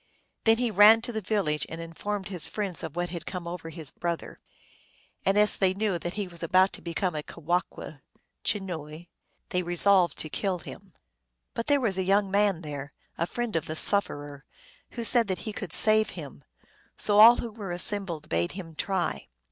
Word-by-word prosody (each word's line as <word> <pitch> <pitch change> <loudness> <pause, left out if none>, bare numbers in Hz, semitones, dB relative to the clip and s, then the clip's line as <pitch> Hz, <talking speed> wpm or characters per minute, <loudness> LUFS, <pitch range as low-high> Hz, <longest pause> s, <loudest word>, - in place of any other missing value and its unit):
Then 225 0 +5
he 240 -1 0
ran 215 +3 +7
to 240 - -4
the 220 -1 -4
village 185 -7 -1
and 165 - -7
informed 190 +4 -5
his 180 -5 +1
friends 200 -5 -4
of 160 -2 -7
what 175 0 -2
had 170 -1 -7
come 180 -2 -6
over 170 -1 -6
the 160 -3 -7
brother. 170 -1 -4 0.9
And 195 +1 +3
as 210 0 +3
they 190 -1 +1
knew 200 -4 -1
that 175 +2 -5
he 205 -2 -3
was 170 -2 -10
about 185 +3 +3
to - - -9
become 175 +1 -2
a 150 - -3
kewahqu 165 -2 -4 0.4
(chenooi) 170 -4 -4 0.4
they 180 - 0
resolved 175 -1 +3
to - - -3
kill 190 +4 -2
him. 170 - -11 0.6
But 230 - -4
there 290 -1 +3
was 205 -7 0
a - - +1
young 195 +1 +1
man 200 -3 +2
there, 145 -1 -7 0.2
a 170 - -2
friend 240 -1 -4
of 165 0 -1
the 155 - -4
sufferer, 145 -7 +3 0.5
who 235 - -2
said 230 -1 +4
that 185 -2 -2
he 215 - -4
could 195 -4 -7
save 215 +3 +5
him. - - -9 0.5
So 205 0 +3
all 230 +3 +10
who 235 - -5
were 205 -4 -7
assembled 175 -3 +1
bade 85 +1 -1
him 175 -4 -8
try. 175 - -2
185 Hz, 190 wpm, -27 LUFS, 165-205 Hz, 0.9 s, all